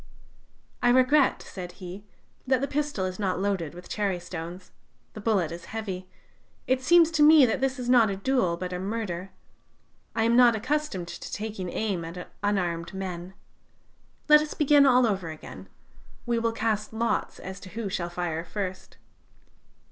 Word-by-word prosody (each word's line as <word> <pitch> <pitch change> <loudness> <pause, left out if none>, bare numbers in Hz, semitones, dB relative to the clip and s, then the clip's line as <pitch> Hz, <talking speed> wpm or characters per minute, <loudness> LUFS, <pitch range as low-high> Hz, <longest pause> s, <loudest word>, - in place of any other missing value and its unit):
"'I 245 - +4
regret,' 260 +3 +4
said 180 -2 -8
he, 185 +2 -9 0.4
'that 260 -1 +3
the 275 - 0
pistol 290 -10 -1
is 185 +1 -5
not 190 -3 0
loaded 190 -6 -1
with 180 - -11
cherry 200 -4 -1
stones... 175 +1 -8 0.4
the 215 - -8
bullet 200 -7 +1
is 170 0 -8
heavy. 190 -5 -5 0.6
It 260 0 +1
seems 335 +3 +5
to 320 -2 +1
me 300 -2 +8
that 240 +2 -1
this 270 0 0
is 250 -1 -5
not 240 -3 +5
a 195 - -2
duel, 195 -5 +1
but 180 +1 -5
a 180 - -3
murder. 195 -2 -4 0.9
I 225 - +2
am 230 +1 +3
not 240 -2 +6
accustomed 235 - -2
to - - -8
taking 210 -4 -4
aim 195 -3 -2
at 170 +2 -8
unarmed 180 -4 -1
men. 185 -1 -6 0.9
Let 300 0 +8
us 305 - -5
begin 290 -1 +5
all 250 -1 +5
over 190 -6 -1
again; 155 -1 -10 0.6
we 235 -1 +1
will 230 0 +1
cast 220 -1 -1
lots 230 +1 -1
as 190 +1 -8
to 185 - -11
who 220 +2 -4
shall 180 -3 -3
fire 175 -2 -3
first.' 185 +1 -6
205 Hz, 170 wpm, -27 LUFS, 180-245 Hz, 0.9 s, me